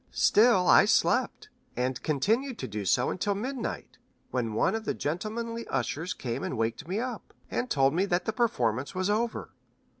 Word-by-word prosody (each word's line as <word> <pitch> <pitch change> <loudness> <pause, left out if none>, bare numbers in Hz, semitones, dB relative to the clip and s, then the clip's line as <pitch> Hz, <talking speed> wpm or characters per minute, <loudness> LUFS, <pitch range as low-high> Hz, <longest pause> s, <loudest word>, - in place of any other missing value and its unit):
Still 215 -4 +4
I - - +7
slept, - - +1 0.3
and 125 +1 -1
continued 220 - 0
so - - -3
to - - -5
do 100 -3 +1
until 200 +2 -1
midnight, 250 +4 -5 0.3
when 120 -3 -1
one - - +2
of 225 0 -3
the - - -1
gentlemanly 230 +8 -4
ushers 165 +5 -2
came 120 -3 -4
and 130 - -3
waked 115 +6 -2
me 190 +4 -1
up, 245 -2 -6 0.2
and 250 - -2
told 135 0 +3
me 185 +4 +2
that 180 -2 0
the 220 - -1
performance 130 - 0
was 185 +2 0
over. 230 +2 -2
185 Hz, 175 wpm, -28 LUFS, -, 0.3 s, I